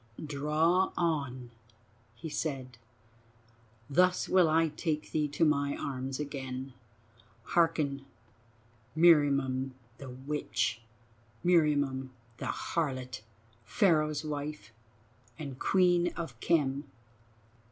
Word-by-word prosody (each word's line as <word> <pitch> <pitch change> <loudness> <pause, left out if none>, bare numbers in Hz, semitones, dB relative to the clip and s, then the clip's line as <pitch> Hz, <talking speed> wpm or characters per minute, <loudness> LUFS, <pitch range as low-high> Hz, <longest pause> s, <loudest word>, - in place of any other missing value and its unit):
"Draw 155 +6 +2
on," 140 -8 -1 0.6
he 160 - -7
said. 135 -6 -4 1.1
"Thus 180 +5 +3
will 185 -3 +4
I 160 +1 +3
take 155 0 -3
thee 150 -1 +1
to 145 +3 +1
my 140 -2 +1
arms 130 0 -4
again. 135 -2 -5 0.7
Hearken, 155 -5 +1 0.9
Meriamun 140 -5 +4 0.3
the 135 - -8
witch—Meriamun 130 +2 -1 0.3
the - - -5
harlot: 130 -8 -2 0.4
Pharaoh's 155 - +2
wife 150 -4 -5 0.6
and 140 -5 -7
Queen 175 -2 +3
of 135 -9 -6
Khem. 145 -2 +1
145 Hz, 85 wpm, -31 LUFS, 130-160 Hz, 1.1 s, will